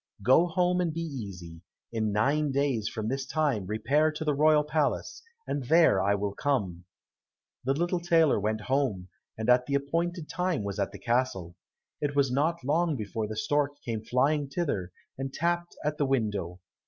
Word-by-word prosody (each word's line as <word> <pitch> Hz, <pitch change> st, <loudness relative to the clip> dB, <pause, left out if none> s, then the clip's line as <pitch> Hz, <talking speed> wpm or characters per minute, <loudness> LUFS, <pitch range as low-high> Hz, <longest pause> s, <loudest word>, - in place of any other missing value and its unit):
Go 130 Hz, -, +5 dB
home 180 Hz, +1 st, +1 dB
and 170 Hz, -2 st, 0 dB
be 165 Hz, +2 st, -4 dB
easy. 95 Hz, -, -7 dB, 0.3 s
In 110 Hz, -2 st, -1 dB
nine 140 Hz, +8 st, +1 dB
days 135 Hz, -6 st, 0 dB
from 110 Hz, -2 st, -4 dB
this 135 Hz, +3 st, -1 dB
time 135 Hz, -, -1 dB
repair 140 Hz, +9 st, +2 dB
to 155 Hz, +1 st, -5 dB
the 150 Hz, -, +2 dB
royal 150 Hz, +1 st, +4 dB
palace, 150 Hz, 0 st, -1 dB, 0.2 s
and 140 Hz, -3 st, -3 dB
there 160 Hz, -, +5 dB, 0.2 s
will 100 Hz, 0 st, -2 dB
I -, -, -14 dB
come." 100 Hz, -, -1 dB, 0.8 s
The 135 Hz, -, +2 dB
little 175 Hz, +3 st, 0 dB
tailor 165 Hz, -6 st, +3 dB
went 110 Hz, +1 st, -1 dB
home, 120 Hz, -8 st, -1 dB, 0.3 s
and 110 Hz, -, -3 dB
at 125 Hz, 0 st, +4 dB
the 140 Hz, -, 0 dB
appointed 165 Hz, +4 st, -1 dB
time 180 Hz, -, -1 dB
was 100 Hz, 0 st, -4 dB
at 100 Hz, -, 0 dB
the -, -, -9 dB
castle. 115 Hz, -8 st, -1 dB, 0.5 s
It 145 Hz, -1 st, -1 dB
was 140 Hz, -3 st, +3 dB
not 155 Hz, +4 st, 0 dB
long 160 Hz, +3 st, +1 dB
before 110 Hz, -1 st, -3 dB
the 110 Hz, 0 st, -6 dB
stork 145 Hz, +3 st, 0 dB
came 110 Hz, -2 st, -3 dB
flying 140 Hz, +5 st, +1 dB
thither 135 Hz, -, -2 dB, 0.3 s
and 135 Hz, 0 st, -3 dB
tapped 175 Hz, +3 st, -1 dB
at 150 Hz, +1 st, -1 dB
the 145 Hz, -, +2 dB
window. 105 Hz, -9 st, -1 dB
135 Hz, 180 wpm, -28 LUFS, 110-155 Hz, 0.8 s, Go